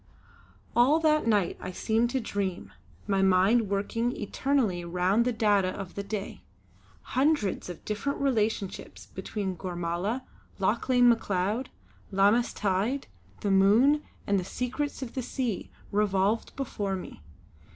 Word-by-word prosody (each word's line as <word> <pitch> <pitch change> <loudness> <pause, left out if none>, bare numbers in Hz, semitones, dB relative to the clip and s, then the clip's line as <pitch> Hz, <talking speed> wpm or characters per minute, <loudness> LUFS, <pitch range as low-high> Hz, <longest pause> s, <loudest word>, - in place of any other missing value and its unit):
All 265 +7 +5
that 305 -4 +3
night 205 -5 +2
I 185 - -5
seemed 225 +5 +1
to 265 - 0
dream, 200 -5 -3 0.3
my 195 -2 +1
mind 195 +4 +4
working 230 +4 0
eternally 215 -4 0
round 180 +6 +1
the 250 - +2
data 210 -4 +2
of 185 0 -5
the 200 - -4
day; 200 0 -5 0.7
hundreds 260 - +1
of 175 - -9
different 215 +7 -2
relationships 220 -7 -1
between 195 -3 -4
Gormala, 175 +6 -3 0.4
Lauchlane 245 +5 +3
Macleod, 215 +1 +1 0.4
Lammas 205 +5 +3
tide, 205 +7 -1 0.4
the 200 - 0
moon 220 +10 +5 0.2
and 200 -1 +2
the - - -3
secrets 265 +7 -3
of 240 - -7
the 260 - -2
sea 245 -4 -3 0.2
revolved 205 +1 +1
before 205 -7 -2
me. 180 - -8
210 Hz, 130 wpm, -28 LUFS, 195-245 Hz, 0.7 s, All